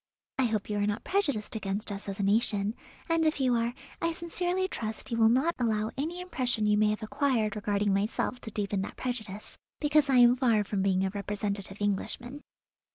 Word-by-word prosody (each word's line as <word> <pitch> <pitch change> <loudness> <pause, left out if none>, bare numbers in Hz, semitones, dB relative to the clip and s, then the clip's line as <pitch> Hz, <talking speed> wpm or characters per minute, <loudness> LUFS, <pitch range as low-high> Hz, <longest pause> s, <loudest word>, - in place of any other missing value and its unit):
I 260 - +4
hope 215 -3 -1
you 210 -1 -1
are 205 - +1
not 205 0 -2
prejudiced 285 - 0
against 210 0 -2
us 200 0 -6
as 195 - -5
a - - 0
nation; 205 0 +2 0.3
and, 330 -1 +2
if 310 -2 +1
you 255 -2 +3
are, 235 +1 0 0.3
I 335 0 +1
sincerely 355 +3 -1
trust 220 - -4
you 230 - 0
will 225 -1 +6
not 265 +8 +3
allow 220 -2 0
any 330 +6 -3
impression 255 -11 0
you 210 0 +4
may 210 0 +3
have 215 +1 -2
acquired 225 -3 0
regarding 205 -1 0
myself 210 +4 -1
to - - -6
deepen 200 -2 -1
that 195 - -6
prejudice, 215 -5 -5 0.2
because 295 -1 +3
I 265 - +4
am 245 0 +7
far 230 -5 +3
from 200 0 -2
being 190 -1 +2
a 190 - -1
representative 200 -1 -2
Englishman." 240 +7 -2
220 Hz, 200 wpm, -29 LUFS, 205-260 Hz, 0.3 s, am